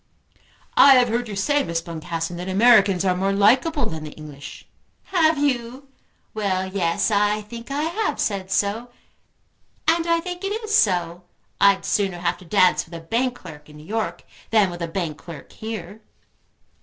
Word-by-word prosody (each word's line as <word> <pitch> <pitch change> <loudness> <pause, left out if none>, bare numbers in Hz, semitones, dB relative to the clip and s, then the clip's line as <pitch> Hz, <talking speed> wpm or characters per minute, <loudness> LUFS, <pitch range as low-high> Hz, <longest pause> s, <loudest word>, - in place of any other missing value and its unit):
"I 275 -1 +8
have 250 -2 +4
heard 240 +2 -1
you 205 - -6
say, 290 +9 +1
Miss 170 -6 -2
Boncassen, 165 0 -5
that 180 +2 -5
Americans 200 -2 +4
were 185 - +3
more 195 +2 0
likeable 255 +8 +3
than 160 -6 -5
the 155 - -6
English." 145 -2 -11 0.5
"Have 320 -3 +3
you? 265 -1 -2 0.4
Well, 195 -3 -1
yes; 190 +2 0
I 210 +1 +2
think 230 +3 -10
I 285 +2 -2
have 375 +7 -2
said 195 -3 -2
so. 210 +5 -1 1.0
And 330 +1 +2
I 335 0 +3
think 355 +2 -7
it 410 +3 -2
is 430 -1 -4
so. 180 - +1 0.3
I'd 200 -1 +4
sooner 195 -3 0
have 175 0 -2
to 185 - -14
dance 185 +1 +3
with 170 - -12
a - - -6
bank 240 +9 -1
clerk 150 -7 -12
in 150 - -14
New 150 - -13
York, 205 -4 -3 0.3
than 210 -5 +3
with 175 0 -8
a 170 - -2
bank 165 -3 -4
clerk 165 -5 -11
here." 220 -1 -7
200 Hz, 175 wpm, -22 LUFS, 175-245 Hz, 1.0 s, I